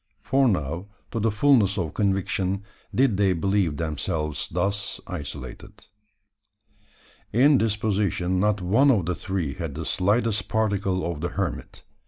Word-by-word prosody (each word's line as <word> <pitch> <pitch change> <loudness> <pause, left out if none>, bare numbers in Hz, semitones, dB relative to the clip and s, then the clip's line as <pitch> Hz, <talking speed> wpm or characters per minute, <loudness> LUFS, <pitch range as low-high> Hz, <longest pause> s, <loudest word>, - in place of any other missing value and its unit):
for 135 0 +3
now, 85 - -1 0.2
to 115 - -2
the 110 +1 +2
fulness 105 -3 +3
of 80 -5 -2
conviction, 95 -1 0 0.3
did 130 -6 +3
they 100 -2 +3
believe 90 -3 0
themselves 75 -1 -2
thus 95 +4 -2
isolated. 70 - -8 1.5
In 135 +5 +5
disposition 100 -4 0
not 105 0 +1
one 115 +11 +4
of 105 -10 +3
the 90 - 0
three 90 -5 -3
had 80 -4 -5
the 80 +1 -5
slightest 105 +4 +1
particle 100 -4 0
of 85 -3 -3
the 85 - -1
hermit. 95 -5 -4
95 Hz, 135 wpm, -25 LUFS, 85-105 Hz, 1.5 s, In